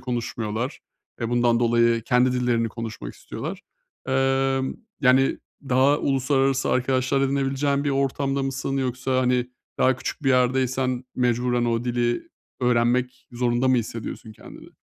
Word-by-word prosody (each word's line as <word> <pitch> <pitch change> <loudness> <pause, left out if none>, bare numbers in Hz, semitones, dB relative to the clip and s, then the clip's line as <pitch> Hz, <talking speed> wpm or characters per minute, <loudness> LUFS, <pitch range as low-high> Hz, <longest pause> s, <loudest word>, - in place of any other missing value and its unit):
konuşmuyorlar. 120 0 -3 0.4
E, 115 - -1
bundan 120 -1 +2
dolayı 115 -1 +3
kendi 125 +2 +3
dillerini 120 -2 +1
konuşmak 110 - -7
istiyorlar. - - -7 0.5
Emm, 135 0 +1 0.3
yani, 130 +1 +4 0.3
daha 135 +3 +4
uluslararası 135 0 +1
arkadaşlar 130 +1 +1
edinebileceğin 140 +1 0
bir 145 - +1
ortamda 135 0 0
mısın 135 0 -2
yoksa, 130 0 -1
hani, 125 -1 +1 0.3
daha 130 0 +3
küçük 130 - -5
bir 135 - +1
yerdeysen 130 0 +1
mecburen 125 0 +1
o 115 0 0
dili 120 -1 -1 0.3
öğrenmek 125 +1 +1
zorunda 120 +1 +1
mı 130 - +4
hissediyorsun 115 -1 -5
kendini? - - -13
125 Hz, 125 wpm, -24 LUFS, 120-135 Hz, 0.5 s, yani